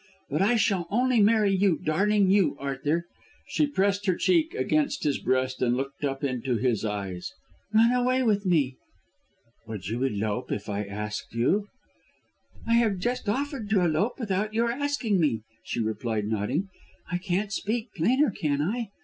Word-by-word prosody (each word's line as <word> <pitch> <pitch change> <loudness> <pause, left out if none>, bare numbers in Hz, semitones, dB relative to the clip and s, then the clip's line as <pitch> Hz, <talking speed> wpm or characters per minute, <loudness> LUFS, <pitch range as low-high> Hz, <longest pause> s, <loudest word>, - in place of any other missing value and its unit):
But 150 +5 +1
I 215 +5 +4
shall 195 -6 +1
only 245 +1 +3
marry 210 -1 +4
you, 190 -4 +3
darling, 195 +5 +2
you. 195 -7 +3
Arthur," 145 +4 -1 0.4
she 300 - +1
pressed 200 -5 0
her 185 - +3
cheek 335 - +2
against 295 -8 0
his 145 -2 +1
breast 130 0 0
and 125 0 +2
looked 135 +2 -5
up 135 0 -2
into 130 -2 -1
his 120 -3 0
eyes, 100 -4 -4 0.4
"run 225 +2 +5
away 250 +1 +2
with 210 -4 +2
me." 150 -9 +1 0.9
"Would 100 -5 -6
you 115 +3 -2
elope 105 -5 -1
if 100 - -3
I 105 0 -2
asked 105 +2 -5
you?" 195 - +1 1.0
"I 230 0 +3
have 220 -5 +2
just 240 +3 -2
offered 265 -2 -2
to 200 -3 +3
elope 175 +7 +1
without 210 -1 -1
your 235 +1 +2
asking 255 -6 0
me," 125 -10 +1 0.2
she 120 - -4
replied 110 -1 -1
nodding. 110 - -1 0.4
"I 180 - 0
can't 195 +2 -1
speak 225 +4 -2
plainer, 250 - +3
can 145 -6 -1
I? 220 +10 -1
185 Hz, 165 wpm, -27 LUFS, -, 1.0 s, run